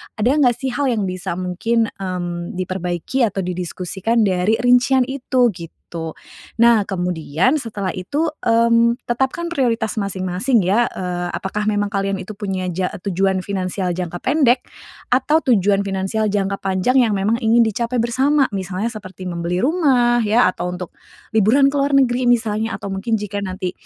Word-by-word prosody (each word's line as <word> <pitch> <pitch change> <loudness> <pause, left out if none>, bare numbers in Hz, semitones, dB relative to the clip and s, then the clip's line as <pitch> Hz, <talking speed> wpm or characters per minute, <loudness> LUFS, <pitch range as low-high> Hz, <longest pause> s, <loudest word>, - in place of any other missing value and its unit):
ada 225 +4 +2
nggak 270 -5 +3
sih 260 +2 -3
hal 285 +1 -1
yang 225 -4 0
bisa 185 -1 -3
mungkin, 220 +6 -1
mmm, 175 -2 -5
diperbaiki 185 - -2
atau 195 -2 -3
didiskusikan 185 +5 -1
dari 190 +2 +2
rincian 250 +1 +4
itu 255 -2 +1
gitu. 170 -3 -10 0.8
Nah 235 -3 +5
kemudian 180 - 0
setelah 210 -9 -3
itu, 280 - -1 0.2
mmm, 230 +1 +3
tetapkan 265 +8 -1
prioritas 235 -9 0
masing-masing 200 +4 0
ya, 200 +6 +2
eee, 180 -1 -3
apakah 210 +2 -3
memang 205 -1 0
kalian 195 -1 -2
itu 200 +3 -8
punya 190 -3 -3
ja 180 +1 -2
tujuan 190 0 0
finansial 185 -2 -2
jangka 175 -1 -4
pendek, 260 - +2 0.4
atau 270 +5 +2
tujuan 200 - +2
finansial 195 +3 -1
jangka 200 -1 -1
panjang 195 +7 +1
yang 225 -4 +3
memang 210 +4 0
ingin 230 0 +4
dicapai 230 +2 -1
bersama. 265 +3 +2
Misalnya 195 +3 -3
seperti 190 -4 -9
membeli 175 +1 -2
rumah 260 -6 +3
ya 215 -2 +4
atau 180 - -4
untuk 180 -1 -7 0.4
liburan 235 +6 +4
ke - - -5
luar 280 0 +2
negeri 250 -2 +2
misalnya 225 -2 +1
atau 200 - -6
mungkin 195 +4 -1
jika 205 -1 -4
nanti 185 -2 -4
210 Hz, 155 wpm, -20 LUFS, 185-240 Hz, 0.8 s, Nah